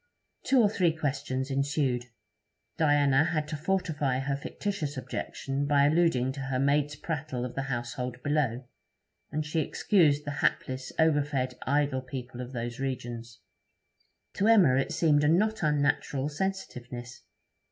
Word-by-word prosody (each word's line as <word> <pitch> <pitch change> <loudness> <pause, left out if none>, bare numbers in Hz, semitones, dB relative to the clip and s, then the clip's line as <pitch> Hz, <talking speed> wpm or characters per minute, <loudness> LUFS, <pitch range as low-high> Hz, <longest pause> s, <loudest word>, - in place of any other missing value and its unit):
Two 260 -3 +4
or - - +6
three 185 -5 +2
questions 140 -3 -2
ensued. 135 -3 0 0.7
Diana 145 -3 +4
had 155 -2 -1
to - - -3
fortify 155 -5 0
her 140 +1 -1
fictitious 150 0 -4
objection 135 +2 -3
by 140 -1 +4
alluding 150 -5 +3
to 135 - -8
her 135 -1 -2
maid's 145 +2 +2
prattle 145 -5 -4
of 125 - -6
the 135 - -2
household 125 0 -3
below; 135 -4 0 0.7
and 155 0 -2
she 150 +2 -1
excused 150 -2 +2
the 145 - -3
hapless, 130 0 -1
overfed, 145 -5 +2
idle 140 -1 +1
people 125 -1 -7
of 125 0 -7
those 120 +1 -4
regions. 120 -3 -5 0.9
To 200 - +1
Emma 190 - +6
it 135 - 0
seemed 150 -3 +3
a - - +4
not 215 +7 +2
unnatural 145 -2 +1
sensitiveness. 125 -9 -5
140 Hz, 140 wpm, -29 LUFS, 130-155 Hz, 0.9 s, or